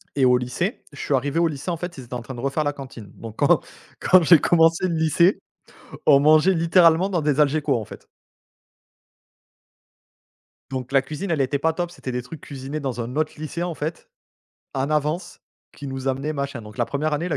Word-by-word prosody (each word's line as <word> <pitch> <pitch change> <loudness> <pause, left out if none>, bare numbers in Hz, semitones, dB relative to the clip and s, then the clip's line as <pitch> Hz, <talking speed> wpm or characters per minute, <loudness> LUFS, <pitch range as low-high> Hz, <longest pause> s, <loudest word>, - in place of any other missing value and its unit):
et 135 -2 +3
au 125 0 +5
lycée, 125 - -3
je 140 - -13
suis - - -2
arrivé 140 +4 0
au 170 - +3
lycée. 155 +3 -4
En 170 - -2
fait, 175 0 -6
ils 130 - -8
étaient 120 - -11
en 125 - -3
train 125 +2 -8
de - - -8
refaire 140 +3 -1
la 145 - -1
cantine. 130 -7 -10
Donc, 115 -1 -10
quand, - - +4 0.4
quand 185 -1 +5
j'ai 165 -1 +7
commencé 165 +1 +3
le 170 - -1
lycée, 160 +4 +3 0.7
on 140 -2 +7
mangeait 155 +6 +5
littéralement 170 +2 +4
dans 175 -4 0
des 150 -1 0
Algeco, 150 0 +2
en 110 - -5
fait! - - -13 2.6
Donc, 130 -1 -5
la 135 - +5
cuisine, 155 +8 -6
elle 150 - +1
était 135 +1 0
pas 160 +1 +1
top. 175 +1 -3
C'était 130 - -7
des 125 - -2
trucs 145 +6 -10
cuisinés 140 +1 -6
dans 130 -4 -3
un 120 +3 -6
autre 155 0 0
lycée, 155 +2 -5
en 175 -2 -3
fait, 155 +3 -5 0.7
en 135 +2 -1
avance, 155 +4 -2 0.3
qu'ils 140 - -8
nous 135 0 -4
amenaient 135 +3 -2
machin. 140 -4 -4
Donc 105 -1 -13
la - - +1
1ère 150 +2 -2
année 160 +4 -1
la 155 - -1
150 Hz, 210 wpm, -23 LUFS, 135-165 Hz, 2.6 s, j'ai